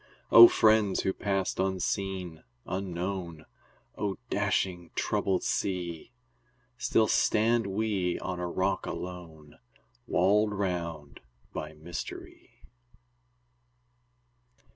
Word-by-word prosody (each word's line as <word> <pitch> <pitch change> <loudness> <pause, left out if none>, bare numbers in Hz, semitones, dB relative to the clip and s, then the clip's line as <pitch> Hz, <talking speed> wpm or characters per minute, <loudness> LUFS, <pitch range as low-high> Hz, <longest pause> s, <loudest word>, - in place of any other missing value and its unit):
O 115 +1 +12
friends 110 -4 +3
who 95 - 0
passed 95 -2 -2
unseen, 95 -2 -2 0.2
unknown! 90 -3 -4 0.5
O 100 -3 -3
dashing, 90 -3 -1
troubled 95 -2 0
sea! 90 -2 -3 0.6
Still 110 -3 +2
stand 115 +1 +2
we 100 -3 -1
on 90 -1 -5
a 90 - -2
rock 95 +3 -1
alone, 85 -4 -8 0.5
Walled 105 +4 +2
round 85 -7 -4 0.3
by 75 0 -5
mystery. 80 +2 -9
95 Hz, 85 wpm, -29 LUFS, 85-100 Hz, 0.6 s, O